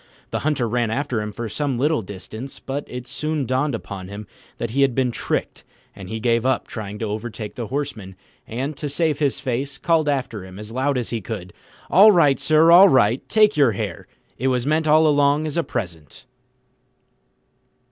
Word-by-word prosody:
The - - -1
Hunter 145 -5 0
ran 120 0 0
after 125 -1 -1
him 105 0 -4
for 115 +3 -5
some 135 +3 -2
little 150 +2 +1
distance; 110 +6 -8
but 140 +2 -5
it 125 0 -7
soon 150 +3 -2
dawned 130 +2 0
upon 95 -4 -7
him 100 +2 -8 0.3
that 115 -1 -4
he 140 +4 +1
had 135 -3 +3
been 130 -2 +1
tricked, - - -3 0.3
and 95 -2 -10
he 110 - -4
gave 115 0 +1
up 130 +1 +1
trying 105 -2 -6
to 110 - -3
overtake 110 0 -5
the 120 -4 -5
Horseman, 120 -9 -4 0.3
and, 135 +6 -4
to 145 - -4
save 150 0 0
his 145 -3 0
face, 135 +2 -3
called 160 0 +1
after 125 -8 -2
him 95 0 -11
as 105 +1 -9
loud 130 +3 0
as 120 - -3
he 115 -2 -2
could, 95 -4 -7 0.4
"All 200 +7 +8
right, 150 -8 +4
sir, 155 +2 +4
all 190 +3 +9
right, 120 -3 +3
take 215 -1 +4
your 140 -7 +4
hare: - - -5 0.3
it 130 - 0
was 125 -2 0
meant 155 +2 +1
all 155 +1 +5
along 145 0 +3
as 155 - -4
a 170 - +2
present." 85 - -6
130 Hz, 195 wpm, -22 LUFS, 110-145 Hz, 0.4 s, all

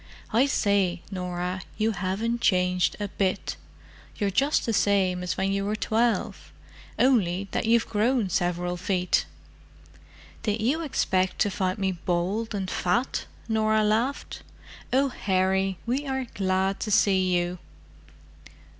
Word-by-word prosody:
"I 250 +5 +4
say, 195 -8 +1
Norah, 180 0 -3 0.2
you 220 +1 +1
haven't 210 +5 -2
changed 180 -4 +2
a 205 - -2
bit. 195 0 -1 0.6
You're 200 -2 0
just 275 +9 +2
the 230 - 0
same 190 -3 +2
as 180 - -3
when 195 +1 0
you 195 0 0
were 210 +2 -1
twelve—only 220 -3 -1
that - - -1
you've 230 0 +3
grown 225 +1 +1
several 175 0 -1
feet." 180 0 0 1.1
"Did 210 0 -1
you 265 +9 +1
expect 190 - 0
to 205 - +2
find 185 0 -1
me 195 -2 0
bald 185 +5 -2
and 195 -2 -2
fat?" 210 +9 0 0.2
Norah 220 -1 +2
laughed. 225 +6 -1 0.5
"Oh, 270 +2 +3
Harry, 190 -3 0
we 265 +5 -1
are 265 -1 -2
glad 190 0 0
to 220 - -3
see 190 -2 +3
you!" 175 +1 -2
195 Hz, 130 wpm, -26 LUFS, 185-225 Hz, 1.1 s, I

